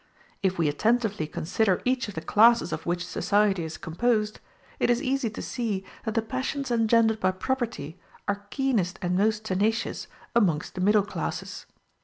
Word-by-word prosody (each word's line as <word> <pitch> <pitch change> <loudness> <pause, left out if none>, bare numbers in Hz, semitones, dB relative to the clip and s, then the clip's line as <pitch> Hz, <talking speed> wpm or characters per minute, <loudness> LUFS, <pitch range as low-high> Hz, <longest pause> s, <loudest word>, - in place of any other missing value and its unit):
If 190 -1 +1
we 165 -2 +2
attentively 210 +2 +1
consider 185 +5 0
each 255 -1 +1
of 205 - -8
the 160 - -3
classes 230 +3 +5
of - - -5
which 175 0 -1
society 205 -3 +1
is 160 0 -6
composed, 215 +5 0 0.4
it - - +2
is 240 0 +3
easy 265 -3 0
to 215 - -7
see 210 -6 -3 0.2
that 220 -1 -2
the 225 - +2
passions 260 +3 -3
engendered 225 -1 +3
by 185 - +2
property 185 - -3 0.3
are 205 0 -2
keenest 220 -10 0
and 180 0 0
most 215 +2 +1
tenacious 215 +3 0 0.3
amongst 175 -10 +2
the 185 - -4
middle 205 +1 +4
classes. - - -5
210 Hz, 165 wpm, -26 LUFS, 185-235 Hz, 0.4 s, classes